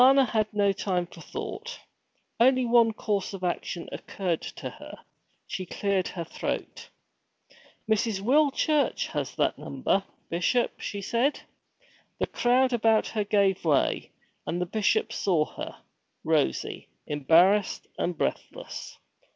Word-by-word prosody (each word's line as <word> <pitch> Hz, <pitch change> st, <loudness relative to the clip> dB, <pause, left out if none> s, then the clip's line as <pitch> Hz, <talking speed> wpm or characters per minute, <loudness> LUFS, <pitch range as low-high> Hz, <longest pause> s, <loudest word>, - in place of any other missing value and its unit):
Alanna 265 Hz, +1 st, +7 dB
had 215 Hz, -1 st, 0 dB
no 200 Hz, -2 st, +2 dB
time 185 Hz, -3 st, -1 dB
for 170 Hz, -, -14 dB
thought. 470 Hz, +3 st, -6 dB, 0.6 s
Only 255 Hz, +1 st, +5 dB
one 235 Hz, -1 st, +5 dB
course 205 Hz, -2 st, -2 dB
of 185 Hz, -, -9 dB
action 175 Hz, -1 st, -2 dB
occurred 180 Hz, -4 st, -3 dB
to -, -, -6 dB
her. -, -, -11 dB, 0.5 s
She 185 Hz, -1 st, -5 dB
cleared 195 Hz, 0 st, 0 dB
her 170 Hz, -, -4 dB
throat. 165 Hz, -, -5 dB, 1.0 s
'Mrs. 220 Hz, -1 st, +1 dB
Will 280 Hz, +8 st, +4 dB
Church 300 Hz, +1 st, +1 dB
has -, -, -3 dB
that -, -, +1 dB
number, 195 Hz, -, 0 dB, 0.2 s
Bishop,' 180 Hz, +9 st, 0 dB
she 200 Hz, -1 st, -4 dB
said. 240 Hz, +8 st, +1 dB, 0.8 s
The -, -, 0 dB
crowd 250 Hz, +1 st, +2 dB
about 225 Hz, -2 st, +3 dB
her 215 Hz, -2 st, -1 dB
gave 200 Hz, -2 st, +2 dB
way, 150 Hz, -4 st, +1 dB, 0.4 s
and 175 Hz, -, -1 dB
the 180 Hz, -, 0 dB
Bishop 210 Hz, +3 st, +1 dB
saw 170 Hz, -6 st, +2 dB
her, -, -, -8 dB, 0.4 s
rosy, 65 Hz, -, 0 dB, 0.2 s
embarrassed, 170 Hz, +7 st, +3 dB
and 175 Hz, -2 st, -1 dB
breathless. -, -, -4 dB
205 Hz, 130 wpm, -27 LUFS, 180-240 Hz, 1.0 s, Alanna